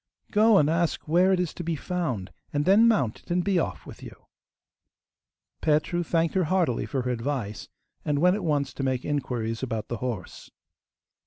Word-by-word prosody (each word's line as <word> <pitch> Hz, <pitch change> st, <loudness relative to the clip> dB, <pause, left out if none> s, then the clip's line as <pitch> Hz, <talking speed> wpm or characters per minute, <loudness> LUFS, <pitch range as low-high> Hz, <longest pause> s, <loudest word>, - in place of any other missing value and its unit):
Go 215 Hz, 0 st, +5 dB
and 145 Hz, -, +4 dB
ask 165 Hz, 0 st, 0 dB
where 180 Hz, +4 st, +4 dB
it 185 Hz, -, +2 dB
is 180 Hz, -3 st, -1 dB
to 175 Hz, -, -6 dB
be 165 Hz, 0 st, -1 dB
found, 155 Hz, -, -3 dB, 0.2 s
and 145 Hz, 0 st, 0 dB
then 205 Hz, +5 st, +6 dB
mount 135 Hz, -, +1 dB
it -, -, -25 dB
and 175 Hz, +1 st, +1 dB
be 195 Hz, -2 st, +2 dB
off 95 Hz, -, -3 dB
with -, -, -11 dB
you.' -, -, -12 dB, 1.4 s
Petru 155 Hz, +3 st, +1 dB
thanked 165 Hz, -1 st, 0 dB
her 185 Hz, -3 st, +2 dB
heartily 155 Hz, -, 0 dB
for 130 Hz, +3 st, -2 dB
her 125 Hz, -, -1 dB
advice, 115 Hz, -3 st, -3 dB, 0.3 s
and 145 Hz, -1 st, 0 dB
went 180 Hz, +5 st, +4 dB
at 205 Hz, -, -4 dB
once 145 Hz, -5 st, 0 dB
to -, -, -6 dB
make 130 Hz, -2 st, -1 dB
inquiries 120 Hz, -6 st, -2 dB
about 115 Hz, -5 st, -3 dB
the 120 Hz, -, -3 dB
horse. 115 Hz, -7 st, -6 dB
150 Hz, 185 wpm, -26 LUFS, 125-180 Hz, 1.4 s, then